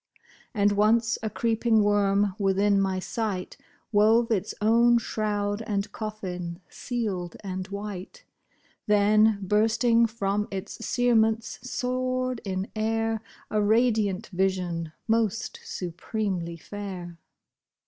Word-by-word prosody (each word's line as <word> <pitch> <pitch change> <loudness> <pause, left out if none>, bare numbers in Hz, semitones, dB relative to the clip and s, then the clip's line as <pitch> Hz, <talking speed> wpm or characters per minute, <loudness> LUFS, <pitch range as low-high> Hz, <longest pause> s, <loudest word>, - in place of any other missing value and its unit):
And 205 -1 +3
once 220 +3 +3
a 220 - -2
creeping 225 -1 +2
worm, 205 -1 +2
within 200 0 +3
my 190 -1 0
sight 195 -1 -3 0.4
Wove 225 +3 +4
its 205 -2 0
own 235 +3 +5
shroud 210 -2 -1
and 200 -1 -1
coffin, 180 -6 -5
sealed 200 -9 -3
and 185 -1 -4
white; 200 - -7 0.6
Then, 210 +1 +4
bursting 225 +4 +3
from 210 -2 -1
its 195 +1 -6
cerements, 225 -2 +2
soared 255 0 -2
in 190 0 -3
air, 225 0 0 0.3
A 215 - +2
radiant 220 -2 +2
vision, 180 -3 -1 0.2
most 225 -1 0
supremely 180 -1 -3
fair. 180 -3 -7
210 Hz, 105 wpm, -26 LUFS, 195-225 Hz, 0.6 s, own